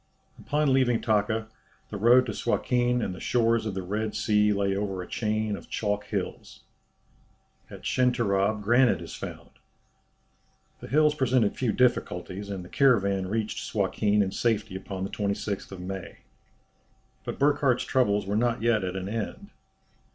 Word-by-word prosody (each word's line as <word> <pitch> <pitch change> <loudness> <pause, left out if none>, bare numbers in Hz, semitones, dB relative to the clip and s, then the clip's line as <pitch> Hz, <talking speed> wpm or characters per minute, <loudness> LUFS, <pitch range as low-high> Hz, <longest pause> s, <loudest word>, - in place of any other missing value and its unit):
Upon 145 -1 +1
leaving 125 -3 +3
Taka, 110 0 0 0.4
the 105 - -4
road 120 +5 +5
to - - -3
Suakin 125 -1 0
and 95 - -3
the 90 - -9
shores 115 -2 +1
of 100 - -4
the 95 - -3
Red 105 +3 -3
Sea 105 -1 +2
lay 100 -1 0
over 100 -2 -2
a - - -11
chain 110 -1 -1
of - - -11
chalk 105 -1 -2
hills. - - -5 1.1
At - - -11
Schenterab 110 -5 +1
granite 120 +4 +4
is - - -9
found. - - -8 1.3
The - - -9
hills 150 +4 +3
presented 130 -7 +1
few 125 -4 0
difficulties, 100 -5 0
and 95 -3 -5
the - - -10
caravan 100 -7 +2
reached 110 +2 -2
Suakin 105 0 +1
in 95 - -3
safety 110 -3 -1
upon 95 0 -5
the 95 - -4
26th 100 -1 -3
May. 95 +1 -7 1.1
But - - -5
Burckhardt's 140 -3 +2
troubles 105 -6 +1
were 100 +1 -2
not 115 0 0
yet 115 -3 +2
at 90 0 -3
an 95 0 -4
end. 115 - -5
110 Hz, 150 wpm, -27 LUFS, 100-120 Hz, 1.3 s, road